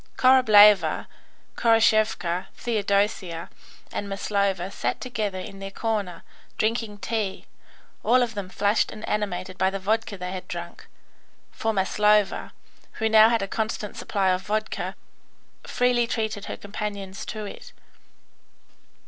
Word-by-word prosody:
Korableva, 215 -6 +6 0.5
Khoroshevka, 215 -6 +2
Theodosia, 200 -6 -1 0.4
and 200 - -4
Maslova 195 -2 -1
sat - - -2
together 215 -6 -3
in 195 +1 -8
their 195 0 -6
corner, 205 -3 -3 0.3
drinking 220 -1 -1
tea, 210 -2 -3 0.6
all 250 +1 +4
of 235 -2 -3
them 200 -3 -5
flushed 205 +3 +1
and 215 - -8
animated 185 -3 -3
by 190 - +3
the 195 - -3
vodka 215 +2 -1
they 180 0 -5
had 185 -1 -6
drunk, 170 -1 -7 0.6
for 225 - -1
Maslova, 210 +1 +2 0.4
who 220 -1 -1
now 220 0 +7
had 230 -3 +1
a - - -3
constant 215 -1 -3
supply 195 -2 0
of 185 0 0
vodka, 215 +2 -3 0.7
freely 245 -1 +2
treated 220 -3 -2
her - - -6
companions 200 -1 -6
to 215 -2 -5
it. - - -10
210 Hz, 125 wpm, -25 LUFS, 195-220 Hz, 0.7 s, now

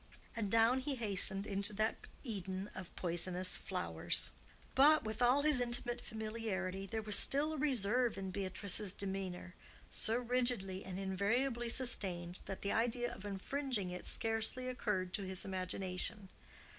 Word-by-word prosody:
And 215 -3 -2
down 230 +4 +4
he 275 +1 -1
hastened 200 -3 +5
into 200 +1 0
that 215 +2 -2
Eden 195 -4 -4
of 185 -2 -9
poisonous 180 +1 +1
flowers. - - 0 0.4
But, 300 +3 +6
with 220 +1 -5
all 250 +4 +4
this 295 -4 +4
intimate 240 0 +1
familiarity, 215 -4 -4
there 220 +1 -3
was 210 -1 +3
still 295 +7 +3
a - - -4
reserve 245 -5 +1
in 190 -1 -4
Beatrice's 195 +1 -1
demeanor, 190 -2 -5 0.4
so 220 - +1
rigidly 240 -6 0
and 185 -1 -6
invariably 230 +6 0
sustained 185 -8 0
that 195 - -6
the 200 - -1
idea 240 +1 0
of 200 - -10
infringing 205 0 -3
it 180 - -6
scarcely 225 +3 0
occurred 200 -7 -2
to 205 - -2
his 185 0 -1
imagination. 185 +1 -3
210 Hz, 145 wpm, -36 LUFS, 190-240 Hz, 0.4 s, But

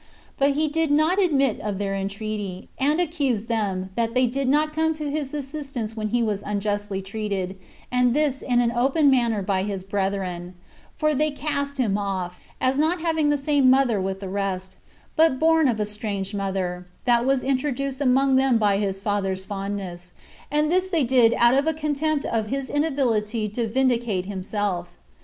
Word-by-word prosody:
But 280 +1 +4
he 310 +2 +1
did 320 +1 0
not 310 +7 +3
admit 275 - +2
of 205 -2 -3
their 200 0 -2
entreaty; 200 -1 -4
and 295 +5 +2
accused 280 -10 0
them, 195 -5 -1
that 230 +2 -1
they 255 0 +4
did 260 +2 -1
not 305 +2 +2
come 320 0 +1
to 300 -2 -4
his 290 -2 -3
assistance 275 -6 -5
when 215 -1 -2
he 235 +2 +1
was 210 -3 -1
unjustly 205 -1 -2
treated, 195 -2 -3 0.4
and 250 0 +3
this 290 -3 +1
in 245 -1 +2
an 235 -1 +1
open 270 +5 +3
manner 235 -5 +2
by 190 -1 0
his 195 -1 -3
brethren; 190 -2 -3 0.4
for 305 -1 +2
they 305 +2 +1
cast 285 -1 -3
him 210 -6 +1
off, 185 -3 -3 0.2
as 260 +2 +1
not 320 +3 +1
having 320 -3 +1
the 295 - +3
same 280 -2 +3
mother 255 -6 +3
with 190 +1 -3
the 195 - -5
rest, 190 -1 -3 0.4
but 320 -4 +4
born 320 0 +4
of 230 -4 0
a 210 - +1
strange 205 -2 -4
mother, 190 -3 -3 0.2
that 240 -1 +4
was 270 0 +1
introduced 275 0 -1
among 265 0 +4
them 265 -2 +3
by 205 -2 +2
his 195 -2 -1
father's 195 -2 -1
fondness; 195 -3 -5 0.4
and 300 +2 +1
this 370 +1 +2
they 335 -6 +2
did 240 -2 +4
out 240 +1 +5
of 275 +3 +2
a 320 - +1
contempt 300 -1 -1
of 220 -2 -1
his 270 +2 -3
inability 240 -8 0
[to 225 +3 -2
vindicate 235 -5 +1
himself]. 190 -2 -3
240 Hz, 180 wpm, -24 LUFS, 200-280 Hz, 0.4 s, out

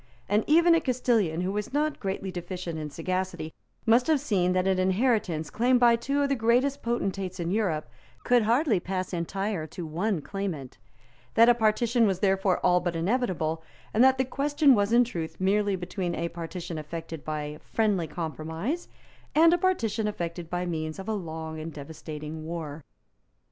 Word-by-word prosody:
And 210 +2 +2
even 335 +3 +6
a 330 - +4
Castilian 230 - +1
who 185 +1 -1
was 210 +5 -4
not 300 +1 0
greatly 190 -1 -3
deficient 175 -2 -5
in 150 -1 -4
sagacity 185 +1 -3 0.3
must 235 +2 +4
have 315 -3 +3
seen 190 -10 +1
that 185 0 +1
an 190 -1 +2
inheritance 185 - +1
claimed 245 +2 +3
by 240 -1 +6
two 275 +5 0
of 280 - 0
the - - +3
greatest 250 +4 +2
potentates 195 -5 -2
in 170 0 -2
Europe 185 - 0 0.4
could 245 -1 +4
hardly 230 - +2
pass 185 +1 -4
entire 180 0 -2
to 175 +2 -7
one 175 +5 -1
claimant; 160 - -5 0.6
that 230 +1 +7
a - - +8
partition 230 +1 +2
was 190 -2 0
therefore 195 -1 +2
all 180 0 +5
but 175 -1 -2
inevitable; 165 - 0 0.3
and 225 - +5
that 265 0 +5
the 260 - +1
question 285 +2 +3
was 205 -2 +2
in 240 +1 +6
truth 170 -9 -5
merely 200 +1 +2
between 180 -1 -3
a 170 +1 -2
partition 170 0 -6
effected 165 0 -7
by 150 -1 -4
friendly 205 -7 0
compromise 160 - -4 0.5
and 330 +2 +6
a - - +4
partition 230 - 0
effected 170 -4 -4
by 180 +1 -2
means 155 -2 -3
of 195 - -8
a 220 - 0
long 160 -4 -5
and 160 +1 -6
devastating 155 +1 -7
war. 160 -2 -6
190 Hz, 175 wpm, -27 LUFS, 165-235 Hz, 0.6 s, a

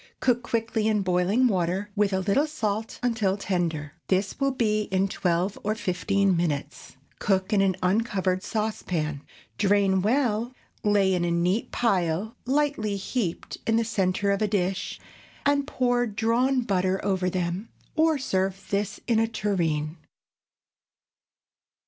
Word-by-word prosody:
Cook 245 -1 +2
quickly 225 -2 -1
in 210 -2 +2
boiling 185 +7 +3
water, 190 0 -1
with 205 -1 +2
a 190 - +1
little 210 +11 +2
salt, 220 -7 -3
until 220 -5 +1
tender. 165 -7 -2
This 190 +4 0
will 275 0 +2
be 215 -5 +1
in 190 +1 +2
twelve 180 +1 -1
or 215 +1 0
fifteen 195 0 +1
minutes. 155 -6 -3 0.2
Cook 190 +1 +1
in 200 - +4
an 190 -2 +2
uncovered 190 -2 +1
saucepan. 180 -10 -2 0.4
Drain 195 -2 +3
well, 235 +1 +1 0.3
lay 200 -2 +3
in 180 -1 +1
a 175 - +1
neat 175 +6 0
pile 195 -2 0
lightly 270 -7 +1
heaped 195 -2 -3
in 225 - +3
the 230 0 +2
centre 200 -2 +1
of 200 - 0
a 215 - +3
dish, 195 -2 -1 0.5
and 285 0 +2
pour 245 -3 +1
drawn 235 +5 +1
butter 190 -4 0
over 190 -2 +1
them, 180 +4 -2 0.3
or 320 -1 +3
serve 195 -6 -2
this 200 0 -1
in 230 -3 +2
a 225 - +2
tureen. 170 -8 -1
200 Hz, 140 wpm, -26 LUFS, 185-225 Hz, 0.5 s, in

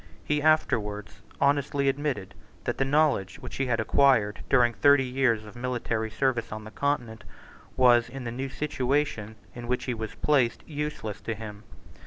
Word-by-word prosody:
He 150 0 0
afterwards 105 -10 0 0.2
honestly 140 0 +1
admitted 135 -8 -1 0.3
that - - -3
the - - +4
knowledge 145 -9 +2
which - - -8
he 135 - 0
had 115 -2 +1
acquired, 110 -5 +3
during 120 -3 +4
thirty 140 0 +5
years 125 -4 +1
of 105 - -12
military 120 -2 -2
service 115 0 -1
on 110 0 -6
the 110 - -10
Continent, 120 -7 -2 0.5
was, 120 -2 +5
in 135 +1 -7
the 120 - -4
new 135 +3 -4
situation 135 -6 -1 0.2
in 120 -1 -8
which 125 +1 -1
he 125 - -2
was 110 -2 -6
placed, 135 -6 +1
useless 150 -8 -4
to 115 - -3
him. 105 -1 -9
125 Hz, 165 wpm, -27 LUFS, 110-140 Hz, 0.5 s, thirty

